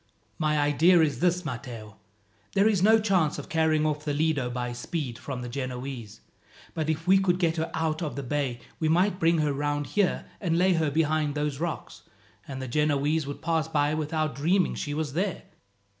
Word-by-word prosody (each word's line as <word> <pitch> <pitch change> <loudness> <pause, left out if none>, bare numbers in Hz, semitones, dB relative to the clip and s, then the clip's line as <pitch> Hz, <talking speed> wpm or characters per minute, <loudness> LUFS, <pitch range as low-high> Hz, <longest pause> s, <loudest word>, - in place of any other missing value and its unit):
"My 155 -1 +1
idea 150 +5 +4
is 155 -3 +1
this, 180 0 +1
Matteo. 115 -6 -7 0.6
There 200 +1 +4
is 205 -5 +2
no 220 +3 +6
chance 185 -8 +1
of - - -8
carrying 160 -1 +2
off 150 -1 -1
the 145 -2 -2
Lido 150 -4 +1
by 125 0 -3
speed 125 0 -4
from 130 -3 -5
the - - -5
Genoese; 125 -3 -6 0.5
but 155 -1 -2
if 160 +1 -2
we 190 +1 +6
could 180 -2 +2
get 170 -2 +1
her 160 +1 -1
out 160 0 -1
of 155 -3 -3
the 140 - -4
bay 135 -2 -2 0.2
we 160 - +1
might 185 +4 +2
bring 165 +1 +3
her 150 -2 +1
round 145 +1 -1
here 205 +2 0
and 165 -4 0
lay 185 +1 +4
her 160 -3 +1
behind 155 -1 +1
those 145 -2 -2
rocks, 165 -2 -4 0.5
and 135 -1 -6
the 130 - -5
Genoese 150 +2 +1
would 145 - -7
pass 160 -1 +1
by 150 -2 +1
without 155 -1 -1
dreaming 175 +7 +2
she 145 -1 -4
was 150 -3 -2
there. 185 +3 -2
155 Hz, 195 wpm, -27 LUFS, 140-165 Hz, 0.6 s, no